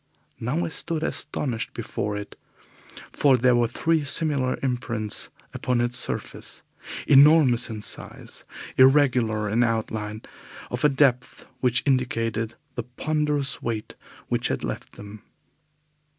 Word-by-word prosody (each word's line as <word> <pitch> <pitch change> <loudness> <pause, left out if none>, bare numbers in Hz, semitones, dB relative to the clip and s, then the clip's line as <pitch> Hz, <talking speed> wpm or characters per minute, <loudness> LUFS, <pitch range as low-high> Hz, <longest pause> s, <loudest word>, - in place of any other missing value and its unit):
Now 140 +9 -1
I - - -3
stood 160 -1 -1
astonished 140 -7 -3
before 105 0 -3
it, 105 0 -8 0.8
for 135 -3 +4
there 125 +1 +4
were 120 -1 +3
three 160 +6 0
similar 140 -3 +2
imprints 120 -4 -2 0.2
upon 125 -1 -1
its 120 0 0
surface, - - -2 0.4
enormous 140 -4 +6
in 110 -2 -6
size, - - -4 0.3
irregular 125 -6 +4
in 115 +4 +2
outline, 110 -2 -2 0.5
of - - -3
a 150 - +6
depth 135 -3 +1
which 125 0 +2
indicated 115 -4 0 0.2
the 120 - -3
ponderous 145 +2 -1
weight 110 -2 -4 0.3
which - - 0
had - - -3
left - - -5
them. 105 +1 -11
125 Hz, 120 wpm, -25 LUFS, 115-140 Hz, 0.8 s, enormous